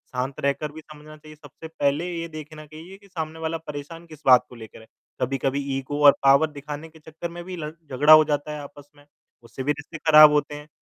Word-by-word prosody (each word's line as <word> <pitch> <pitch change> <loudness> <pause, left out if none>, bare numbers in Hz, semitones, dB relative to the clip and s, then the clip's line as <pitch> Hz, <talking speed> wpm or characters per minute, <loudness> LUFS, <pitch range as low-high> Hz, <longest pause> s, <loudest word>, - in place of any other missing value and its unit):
शांत 130 +2 -3
रहकर 140 +2 -2
भी 160 - -11
समझना 155 0 -14
चाहिए, 155 0 -15
सबसे 160 +1 -13
पहले 150 +1 -1
ये 165 0 -4
देखना 155 -1 -10
कहिए 160 +5 -13
कि 200 0 -21
सामने 160 -3 -6
वाला 160 0 -3
परेशान 160 +2 -9
किस 155 -2 -14
बात 125 -2 +6
को 125 - -13
लेकर 110 -2 -12
है। 110 - -18 0.3
कभी-कभी 135 +1 -1 0.2
ईगो 140 +2 -5
और 140 - +11
पावर 140 +3 +5
दिखाने 150 +2 -8
के 160 0 -19
चक्कर 160 +2 -8
में 175 +1 -9
भी 185 +1 -7
लड़ 150 -2 -6 0.2
झगड़ा 150 +4 +6
हो 155 - +8
जाता 150 0 -2
है 150 - -6
आपस 145 0 -13
में 145 0 -21 0.4
उससे 130 +3 -8
भी 145 - +1
रिश्ते 150 +3 -7
ख़राब 155 -1 +7
होते 145 0 -1
हैं 150 +1 -11
150 Hz, 225 wpm, -23 LUFS, 145-160 Hz, 0.4 s, और